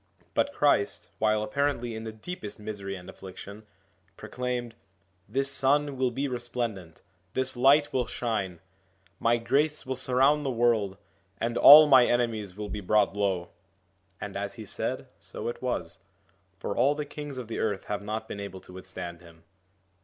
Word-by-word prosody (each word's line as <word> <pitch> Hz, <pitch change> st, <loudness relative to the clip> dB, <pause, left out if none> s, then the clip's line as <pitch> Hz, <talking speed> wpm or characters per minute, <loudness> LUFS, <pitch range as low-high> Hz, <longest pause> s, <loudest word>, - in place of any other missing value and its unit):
But 285 Hz, -, +1 dB
Christ, 145 Hz, -, +1 dB
while 110 Hz, -1 st, +2 dB
apparently 120 Hz, +1 st, -1 dB
in 110 Hz, 0 st, -6 dB
the 110 Hz, -, -4 dB
deepest 110 Hz, -, -7 dB
misery 100 Hz, -2 st, -5 dB
and 90 Hz, -1 st, -10 dB
affliction, 100 Hz, +3 st, -10 dB, 0.5 s
proclaimed: 120 Hz, +1 st, -4 dB, 0.3 s
' 95 Hz, -1 st, -42 dB
This 135 Hz, +1 st, 0 dB
Sun 140 Hz, +1 st, +2 dB
will 130 Hz, -1 st, +1 dB
be 135 Hz, +4 st, -2 dB
resplendent, 120 Hz, -8 st, -4 dB, 0.3 s
this 130 Hz, 0 st, 0 dB
Light 140 Hz, +4 st, +4 dB
will 125 Hz, -3 st, +1 dB
shine, 100 Hz, -9 st, -3 dB, 0.6 s
my 115 Hz, +1 st, +3 dB
grace 145 Hz, +6 st, 0 dB
will 130 Hz, -, -2 dB
surround 135 Hz, +3 st, +3 dB
the 140 Hz, -, -1 dB
world, 115 Hz, -5 st, +1 dB, 0.4 s
and 115 Hz, +1 st, -1 dB
all 150 Hz, +4 st, +11 dB
my 130 Hz, -4 st, +7 dB
enemies 110 Hz, -6 st, -1 dB
will 105 Hz, 0 st, -4 dB
be 105 Hz, 0 st, -5 dB
brought 105 Hz, +1 st, +2 dB
low.' 95 Hz, -4 st, 0 dB, 0.7 s
And -, -, -6 dB
as -, -, -4 dB
he -, -, -8 dB
said, -, -, -3 dB
so -, -, -7 dB
it 120 Hz, -, -4 dB
was: 125 Hz, -1 st, -3 dB, 0.6 s
for -, -, -4 dB
all 145 Hz, +2 st, +3 dB
the 150 Hz, 0 st, -3 dB
kings 145 Hz, -1 st, -7 dB
of 125 Hz, -3 st, -6 dB
the 115 Hz, -, -4 dB
earth 105 Hz, -3 st, -1 dB
have 105 Hz, 0 st, -3 dB
not 110 Hz, +2 st, -4 dB
been 100 Hz, -, -6 dB
able 100 Hz, -2 st, -7 dB
to -, -, -14 dB
withstand 90 Hz, -2 st, -7 dB
him. 85 Hz, -2 st, -17 dB
115 Hz, 170 wpm, -28 LUFS, 100-130 Hz, 0.7 s, all